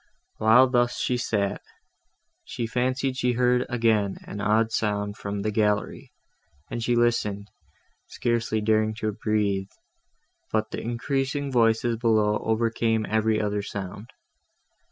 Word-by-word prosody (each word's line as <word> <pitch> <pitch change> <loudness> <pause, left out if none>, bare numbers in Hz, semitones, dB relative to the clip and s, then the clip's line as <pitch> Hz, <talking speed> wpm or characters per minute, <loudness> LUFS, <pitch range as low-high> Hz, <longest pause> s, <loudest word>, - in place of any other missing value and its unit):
While 115 +4 +6
thus 120 -1 +1
she 125 - 0
sat, 105 -5 -1 0.8
she 120 - -4
fancied 130 +3 -1
she 125 -1 +1
heard 125 +1 +2
again 110 -5 +1
an 105 - -6
odd 110 +2 +2
sound 105 -2 -1
from 100 -1 -4
the 110 - 0
gallery, 105 -1 -1 0.6
and 120 - -3
she 120 +1 +1
listened, 105 -4 0 0.6
scarcely 115 -2 -1
daring 110 0 +1
to 110 -1 -2
breathe, 100 -2 -1 0.8
but 110 0 -1
the - - -4
increasing 135 +4 -2
voices 115 -1 +2
below 110 -2 +2
overcame 115 0 0
every 110 0 +1
other 105 -1 -1
sound. 100 +2 -7
110 Hz, 125 wpm, -25 LUFS, 105-120 Hz, 0.8 s, While